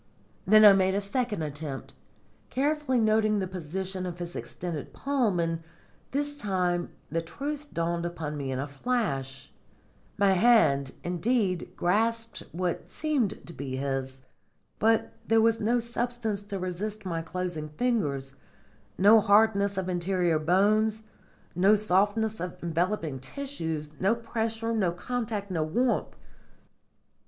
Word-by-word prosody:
Then 215 Hz, +2 st, +8 dB
I 205 Hz, -, +11 dB
made 190 Hz, 0 st, +2 dB
a -, -, +2 dB
second 210 Hz, -2 st, -2 dB
attempt, 145 Hz, -2 st, -5 dB, 0.6 s
carefully 285 Hz, -1 st, +1 dB
noting 215 Hz, -1 st, +3 dB
the 195 Hz, -, 0 dB
position 185 Hz, +1 st, -4 dB
of 175 Hz, -1 st, -6 dB
his 175 Hz, 0 st, -6 dB
extended 170 Hz, -5 st, -5 dB
palm, 250 Hz, -10 st, 0 dB
and 165 Hz, -1 st, -1 dB, 0.5 s
this 290 Hz, +1 st, -2 dB
time 180 Hz, -5 st, 0 dB, 0.2 s
the 165 Hz, +1 st, 0 dB
truth 290 Hz, -, -5 dB
dawned 170 Hz, 0 st, -1 dB
upon 165 Hz, -3 st, -4 dB
me 140 Hz, -2 st, -3 dB
in 130 Hz, -, -2 dB
a 140 Hz, +2 st, -2 dB
flash. 140 Hz, -, -2 dB, 0.7 s
My 200 Hz, -1 st, +4 dB
hand, 185 Hz, -, +4 dB
indeed, 185 Hz, +1 st, 0 dB
grasped 230 Hz, +5 st, 0 dB
what 175 Hz, 0 st, -3 dB
seemed 290 Hz, -9 st, -1 dB
to 170 Hz, -, -10 dB
be 135 Hz, -3 st, -5 dB
his. 135 Hz, -1 st, -3 dB, 0.6 s
But 225 Hz, +1 st, +2 dB
there 225 Hz, 0 st, +4 dB
was 225 Hz, 0 st, +3 dB
no 230 Hz, +3 st, +2 dB
substance 235 Hz, -3 st, -2 dB
to 205 Hz, -1 st, -5 dB
resist 195 Hz, +3 st, -4 dB
my 165 Hz, -3 st, -2 dB
closing 165 Hz, -2 st, -4 dB
fingers, 150 Hz, -, -1 dB, 0.6 s
no 210 Hz, +4 st, +7 dB
hardness 200 Hz, -1 st, +4 dB
of 190 Hz, -1 st, -1 dB
interior 175 Hz, -2 st, +1 dB
bones, 210 Hz, +6 st, +2 dB, 0.5 s
no 195 Hz, +5 st, +5 dB
softness 210 Hz, +2 st, +1 dB
of 180 Hz, +1 st, -5 dB
enveloping 170 Hz, -3 st, -1 dB
tissues, 160 Hz, -, -4 dB
no 195 Hz, +5 st, +3 dB
pressure, 225 Hz, 0 st, -2 dB
no 190 Hz, -6 st, +1 dB
contact, 215 Hz, -1 st, -3 dB
no 165 Hz, -3 st, 0 dB
warmth. 235 Hz, +12 st, 0 dB
195 Hz, 130 wpm, -28 LUFS, 170-225 Hz, 0.7 s, I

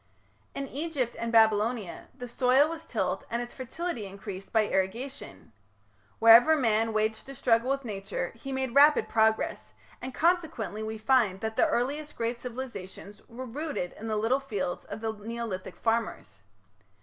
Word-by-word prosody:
In 275 Hz, 0 st, -3 dB
Egypt 285 Hz, -5 st, -2 dB
and 230 Hz, 0 st, -2 dB
Babylonia 220 Hz, -2 st, +2 dB
the 245 Hz, -, -6 dB
soil 255 Hz, +4 st, +4 dB
was 325 Hz, 0 st, -7 dB
tilled -, -, -2 dB
and 235 Hz, -, -1 dB
its 240 Hz, 0 st, -6 dB
fertility 260 Hz, -, -4 dB
increased 195 Hz, 0 st, -8 dB
by 220 Hz, -2 st, +3 dB
irrigation. 210 Hz, -, -3 dB, 0.6 s
Wherever 230 Hz, +8 st, +8 dB
man 225 Hz, -5 st, +2 dB
waged 220 Hz, +3 st, -1 dB
a 275 Hz, -, -8 dB
struggle 240 Hz, 0 st, +2 dB
with 275 Hz, -1 st, -1 dB
Nature 195 Hz, -4 st, -4 dB
he 270 Hz, +4 st, -8 dB
made 265 Hz, -2 st, -2 dB
rapid 290 Hz, +2 st, +6 dB
progress, 220 Hz, 0 st, +1 dB, 0.3 s
and 260 Hz, -, -5 dB
consequently 310 Hz, -, 0 dB
we 220 Hz, 0 st, -4 dB
find 215 Hz, -5 st, +2 dB
that 220 Hz, 0 st, -3 dB
the -, -, +4 dB
earliest 290 Hz, +5 st, -2 dB
great 235 Hz, +1 st, -2 dB
civilizations 230 Hz, -5 st, -8 dB
were 250 Hz, +3 st, -7 dB
rooted 275 Hz, -, -4 dB
in 225 Hz, -, -8 dB
the 215 Hz, -1 st, -1 dB
little 230 Hz, +5 st, +2 dB
fields 205 Hz, -10 st, -4 dB
of 205 Hz, +2 st, -7 dB
the 225 Hz, -1 st, -1 dB
Neolithic 220 Hz, -2 st, -5 dB
farmers. 225 Hz, -, -2 dB
230 Hz, 155 wpm, -28 LUFS, 215-265 Hz, 0.6 s, Wherever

